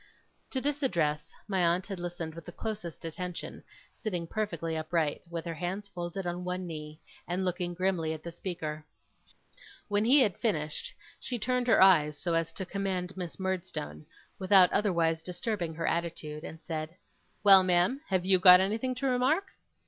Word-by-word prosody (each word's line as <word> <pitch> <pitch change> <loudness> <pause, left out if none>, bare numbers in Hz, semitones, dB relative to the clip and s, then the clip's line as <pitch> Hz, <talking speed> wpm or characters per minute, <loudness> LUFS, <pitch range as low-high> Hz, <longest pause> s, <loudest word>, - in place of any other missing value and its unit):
To 260 - -1
this 290 +2 -2
address, 155 - 0 0.2
my 190 -3 +1
aunt 175 +2 +2
had 195 -3 -6
listened 175 -2 -5
with 165 0 -11
the - - -6
closest 205 -6 -6
attention, 180 +2 -6 0.3
sitting 180 -7 -4
perfectly 165 -4 -3
upright, 155 -1 -1
with 170 0 -5
her 170 - -3
hands 180 +5 -4
folded 175 0 -5
on 175 +1 -3
one 180 0 -3
knee, 155 -2 -7 0.3
and 180 +2 -1
looking 180 -1 -2
grimly 180 -3 0
on 160 - -4
the 170 - -6
speaker. 160 -3 -5 1.1
When 205 0 +2
he 265 +5 +6
had 205 -8 +1
finished, 155 -10 -1 0.3
she 245 - -3
turned 250 +1 0
her 230 - +6
eyes 150 -6 +5
so 170 +1 -2
as 165 0 0
to 190 - -4
command 190 -1 -3
Miss 180 -2 -6
Murdstone, 180 - -4 0.3
without 190 -2 +5
otherwise 170 -5 +2
disturbing 175 -1 -3
her 165 +1 -3
attitude, 165 -2 -2
and 160 -1 -9
said: 160 0 -4 0.5
'Well, 195 -2 +9
ma'am, 185 +9 +2
have 185 -2 0
YOU 190 -1 +5
got 180 -1 +9
anything 225 +7 0
to 275 - -4
remark? 270 +10 +1
180 Hz, 170 wpm, -30 LUFS, 165-195 Hz, 1.1 s, Well